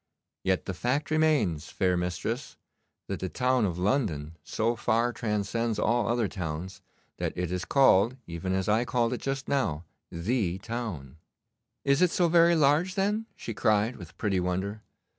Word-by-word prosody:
Yet 95 -1 +1
the 95 - -3
fact 130 - -1
remains, 145 - +2
fair 90 -1 +1
mistress, 90 +9 -3 0.5
that - - -4
the 95 - -3
town 125 0 +2
of 90 -3 -2
London 90 - 0
so 115 +7 0
far 115 +2 +1
transcends 110 +1 -1
all 115 -1 +1
other 120 -1 +1
towns 90 -1 -5 0.4
that - - -3
it 90 -1 -2
is 90 0 -2
called, 130 -3 +4
even 85 +2 -4
as 95 0 0
I 110 +3 +3
called 120 -1 0
it 125 - -4
just 135 0 -3
now, 85 - 0 0.3
the 95 +1 -1
town.' 95 - -5 0.7
'Is 140 +2 +3
it 180 - +5
so 175 0 +2
very 170 0 +5
large, 155 +5 +3
then?' 210 +3 0
she 115 - -6
cried, 110 +3 +1
with - - -12
pretty 100 -4 0
wonder. 95 +4 -2
110 Hz, 160 wpm, -28 LUFS, 90-130 Hz, 0.7 s, it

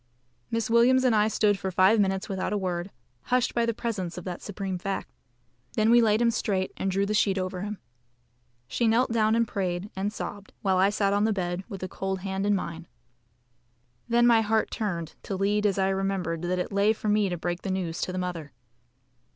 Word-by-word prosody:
Miss 230 -2 -1
Williams 240 +3 +4
and 250 -3 +3
I 210 0 +4
stood 210 -2 +2
for 190 - -2
five 190 +4 +4
minutes 190 -1 +1
without 190 0 -2
a - - +1
word, 180 -1 -2 0.4
hushed 250 -1 +1
by 235 -1 +1
the 230 - +1
presence 200 -8 -3
of 180 - -6
that 180 -1 -5
supreme 195 -2 -4
fact. 195 +2 -4 0.6
Then 220 +1 +3
we 240 0 +7
laid 220 0 +3
him 235 - +4
straight, 195 -5 -1
and 195 - -2
drew 195 +1 +1
the 210 - -1
sheet 200 -2 +2
over 185 -1 -3
him. 210 +1 -4 0.9
She 235 - 0
knelt 235 +3 +3
down 220 -1 +3
and 230 0 +2
prayed 185 0 -3
and 195 +2 -1
sobbed, 205 -1 -7
while 190 -2 +2
I 190 +2 +4
sat 200 -1 +1
on 205 +1 +2
the 220 - +2
bed, 175 -1 -2
with 195 -4 -7
the 185 - -3
cold 190 0 -4
hand 195 +1 -2
in 205 - +3
mine. 170 -3 -5 1.2
Then 240 +1 +4
my 230 -2 +6
heart 220 0 +1
turned 175 -7 -3
to 195 - -4
lead 205 +2 +1
as 200 - 0
I 190 0 +2
remembered 190 -4 -1
that 180 +1 -1
it 180 - -3
lay 200 +2 +3
for 215 - -6
me 210 -1 +3
to 175 - -3
break 175 +1 -3
the - - -4
news 185 -3 -2
to - - -1
the 185 - -4
mother. 170 -6 -4
195 Hz, 215 wpm, -27 LUFS, 185-215 Hz, 1.2 s, we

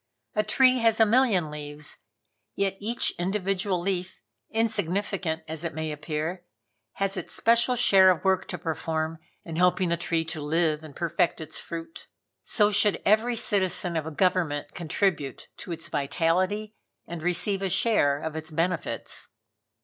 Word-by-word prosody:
A 215 - +2
tree 255 +3 +4
has 225 -1 +3
a 225 - +7
million 215 -9 +2
leaves, 150 0 -6 0.6
yet 195 -1 0
each 230 +4 -1
individual 190 0 0
leaf, 185 0 -3 0.3
insignificant 200 -6 -1
as 160 +1 -5
it 165 -3 -4
may 160 -1 -3
appear, 155 +4 -4 0.5
has 195 0 -1
its - - -6
special 235 +2 +3
share 195 -6 +6
of 185 +1 +1
work 190 -1 +2
to 180 - -4
perform 160 -1 -3 0.3
in 165 -1 -6
helping 180 0 +3
the 170 - +1
tree 165 -1 -1
to 160 -1 -5
live 155 0 +1
and 155 -3 -11
perfect 170 0 0
its 160 -1 -5
fruit. 165 0 -8 0.3
So 210 -1 +2
should 205 0 +4
every 220 +4 +3
citizen 190 -6 +2
of 160 -1 -2
a - - -4
government 155 -4 0
contribute 165 -4 -2
to - - -8
its 165 -1 -6
vitality 185 +9 0 0.3
and 170 -1 -7
receive 180 +3 +1
a 195 - -1
share 170 -8 +2
of 160 -1 -4
its 160 +1 -5
benefits. 165 +1 -2
180 Hz, 155 wpm, -26 LUFS, 160-200 Hz, 0.6 s, a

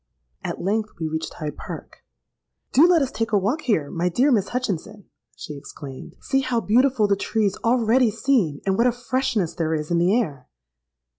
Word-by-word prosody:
At - - -4
length 215 +3 0
we 160 - -1
reached 160 0 -4
Hyde 150 -2 -5
Park. - - -9 0.7
'Do 305 +7 +6
let 345 -4 +4
us 265 - -3
take 225 0 -2
a 210 - +4
walk 220 +11 0
here, 160 - 0
my 175 +2 0
dear 255 +11 +2
Miss 205 -6 +2
Hutchinson,' 210 -5 -3 0.3
she 150 - -8
exclaimed: 140 -1 -10
'see 270 - +1
how 255 -3 0
beautiful 245 +1 +3
the 200 - +3
trees 210 0 0
already 235 +1 +3
seem; 210 - +1
and 195 +1 +1
what 240 - +5
a - - +4
freshness 240 -7 -1
there 160 -1 -1
is 150 +1 -4
in 170 - +3
the 185 +7 +3
air!' 140 - -4
215 Hz, 190 wpm, -23 LUFS, 170-250 Hz, 0.7 s, Do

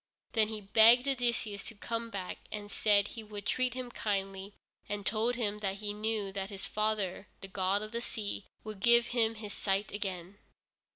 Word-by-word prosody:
Then 220 -2 +3
he 215 -1 -4
begged 230 +5 +7
Odysseus 235 -6 +1
to 225 - -7
come 230 +2 -3
back, 195 -4 -5
and 205 -1 -6
said 205 -1 +3
he 230 - -7
would 210 -2 -8
treat 255 +1 +1
him 255 -1 -5
kindly, 195 -2 -3 0.3
and 205 -1 -3
told 230 +3 +1
him 210 -3 -1
that 195 -2 -1
he 205 0 -3
knew 210 -1 -1
that 195 0 -3
his 195 -2 -5
own - - -23
father, 210 -3 0
the 195 - -7
god 190 +2 0
of 215 - -7
the 235 0 -2
sea, 205 -4 -4 0.2
would 215 -2 -7
give 235 +3 +5
him 225 -2 +2
his 210 -2 -7
sight 195 +1 -1
again. 195 -1 -4
210 Hz, 190 wpm, -32 LUFS, 200-225 Hz, 0.3 s, begged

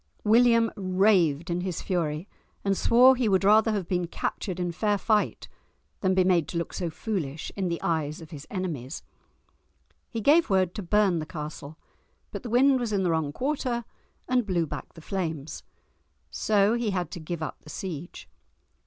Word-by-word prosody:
William 230 +1 +4
raved 185 -5 +2
in 175 +1 -1
his 180 -2 -4
fury, 165 -2 -2 0.4
and 195 0 +2
swore 250 +6 +6
he 245 -3 +1
would 190 -1 +2
rather 215 +3 +5
have 200 -5 -2
been 180 -2 -1
captured 180 +2 -4
in 175 -1 -1
fair 205 +4 0
fight 210 +1 0 0.5
than 190 -1 +1
be 185 - +4
made 180 -4 +2
to 170 - -4
look 170 - -3
so 175 -2 -2
foolish 160 -6 -4
in 195 -2 -1
the 170 -1 -2
eyes 155 -2 -1
of 165 -1 -12
his 145 -2 -9
enemies. 165 -10 -4 1.1
He 230 - -4
gave 295 +8 +4
word 185 -2 +2
to 215 - -5
burn 195 -2 +2
the 155 - -5
castle, 150 0 -7 0.5
but - - -5
the 245 - -7
wind 260 +3 +4
was 235 -3 -2
in 200 -2 +1
the 175 - +1
wrong 160 -3 0
quarter 250 - -2 0.4
and 255 -1 +2
blew 180 -5 0
back - - -7
the 165 - -11
flames. 160 -5 -4 0.7
So 210 0 +2
he 235 -2 0
had 180 -5 -2
to - - -6
give 160 0 -5
up - - -6
the - - -14
siege. 175 0 -7
185 Hz, 180 wpm, -27 LUFS, 165-215 Hz, 1.1 s, swore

